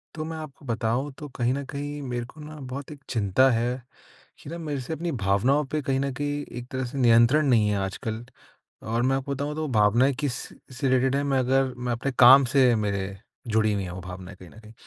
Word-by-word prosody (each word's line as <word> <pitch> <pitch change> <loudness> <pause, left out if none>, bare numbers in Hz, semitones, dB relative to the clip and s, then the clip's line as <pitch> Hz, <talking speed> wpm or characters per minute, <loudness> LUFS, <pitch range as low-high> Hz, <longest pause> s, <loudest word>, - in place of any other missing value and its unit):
तो 155 - -4
मैं 160 0 -5
आपको 155 -2 -10
बताऊँ, 120 +4 -1
तो 150 - -7
कहीं 125 0 +1
न 140 +1 -3
कहीं 145 +1 -5
मेरे 120 -3 -3
को 155 - -16
ना 155 +1 -9
बहुत 140 +3 -6
एक 150 - -10
चिंता 115 +3 +3
है। 120 +2 -1 0.6
कि - - -9
ना, 170 - -5
मेरे 150 -5 -4
से 130 +6 -5
अपनी 170 +2 -3
भावनाओं 120 +5 +2
पे 155 - 0
कहीं 135 -1 0
न 140 0 -1
कहीं 145 +1 -2 0.2
एक 120 - -9
तरह 130 0 -2
से 125 +3 -7
नियंत्रण 120 +5 +5
नहीं 110 -5 +4
है 105 - +1
आजकल 110 +4 -4 0.6
और 115 +1 0
मैं 135 +1 +2
आपको 135 +1 -3
बताऊँ, 145 +2 -3
तो 155 0 -2
भावनाएँ 120 +3 +3
किस 145 -4 -1 0.4
से 135 +1 0
रिलेटेड 130 +1 +2
हैं, 140 - 0
मैं 135 -2 +1
अगर 130 +1 +2
मैं 125 0 -3
अपने 120 +4 -2
काम 130 +2 +9
से 130 -4 +5
मेरे 100 -2 -2 0.3
जुड़ी 110 -1 +2
हुई 100 -1 -1
हैं 90 - -6
वो 90 +1 -7
भावनाएँ, 90 +1 -9
कहीं 90 - -12
न - - -15
कहीं। 110 0 -14
130 Hz, 230 wpm, -26 LUFS, 110-140 Hz, 0.6 s, काम